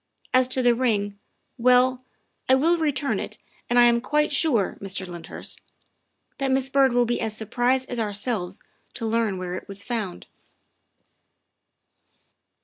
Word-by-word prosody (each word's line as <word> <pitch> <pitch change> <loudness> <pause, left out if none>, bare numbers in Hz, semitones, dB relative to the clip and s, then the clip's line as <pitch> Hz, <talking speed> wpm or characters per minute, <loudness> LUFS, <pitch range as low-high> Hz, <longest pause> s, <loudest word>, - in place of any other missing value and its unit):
As 255 0 +5
to 255 0 0
the 245 -1 +5
ring 205 -5 -1 0.4
well, 250 +1 +4 0.5
I 260 - +7
will 330 +6 +2
return 290 -3 0
it, - - -6 0.3
and 245 - +2
I 245 - +8
am 235 0 +4
quite 300 +3 +1
sure, 255 - +2
Mr. 195 -1 -4
Lynd 175 -2 -9
hurst, - - -8 0.8
that 275 -1 0
Miss 265 0 +3
Byrd 270 -1 +4
will 245 0 +3
be 240 +1 -1
as 220 -2 -2
surprised 250 +4 0
as 245 - -4
ourselves 205 -3 -2 0.3
to 230 - -4
learn 225 -3 0
where 180 -1 -5
it 185 - -6
was 200 0 -8
found." 215 -7 -4
240 Hz, 150 wpm, -24 LUFS, 205-260 Hz, 0.8 s, I